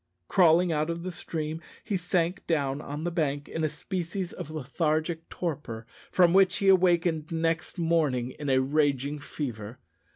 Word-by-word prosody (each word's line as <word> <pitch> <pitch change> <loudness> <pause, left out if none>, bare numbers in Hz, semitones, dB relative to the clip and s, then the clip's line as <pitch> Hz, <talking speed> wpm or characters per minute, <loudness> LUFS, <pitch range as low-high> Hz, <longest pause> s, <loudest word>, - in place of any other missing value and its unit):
Crawling 175 0 +5
out 155 0 0
of 170 0 -3
the 185 - -3
stream, 160 -1 -4 0.2
he 205 - -2
sank 180 +1 -1
down 140 -3 0
on 150 +2 -5
the 175 - -1
bank 145 -4 -1
in 160 - -3
a 155 - +2
species 175 +3 -4
of - - -7
lethargic 155 +3 -1
torpor, 135 -10 -4 0.2
from 175 -2 +4
which, 190 -1 +5
he 195 -2 +3
awakened 175 -4 +3
next 165 +1 -1
morning 155 -8 +1
in 145 -2 -3
a 130 - +4
raging 145 0 +1
fever. 120 -6 -6
160 Hz, 160 wpm, -28 LUFS, 145-175 Hz, 0.2 s, Crawling